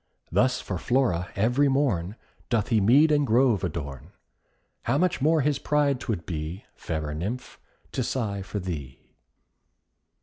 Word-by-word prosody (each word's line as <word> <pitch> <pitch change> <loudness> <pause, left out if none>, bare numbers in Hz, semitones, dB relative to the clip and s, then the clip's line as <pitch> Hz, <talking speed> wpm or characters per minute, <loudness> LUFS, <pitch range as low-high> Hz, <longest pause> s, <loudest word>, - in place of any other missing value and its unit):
Thus 125 +8 +2
for 95 -4 -4
Flora, 115 -9 +1
every 125 +8 +3
morn, 110 -9 0 0.3
Doth 115 -2 +1
he 110 -3 +3
mead 140 +10 +5
and 145 -2 +3
grove 120 -3 +3
adorn. 70 -7 -5 0.7
How 125 +4 +2
much 180 -2 +1
more 155 +2 +4
his 145 +1 +1
pride 145 -3 +1
'twould 100 -10 -3
be, 80 +3 -5
Fairer 75 -2 -4
Nymph, 100 +11 -5 0.3
to - - -2
sigh 110 -5 -2
for 95 +2 -6
thee! 75 -9 -6
110 Hz, 140 wpm, -26 LUFS, 90-135 Hz, 0.7 s, mead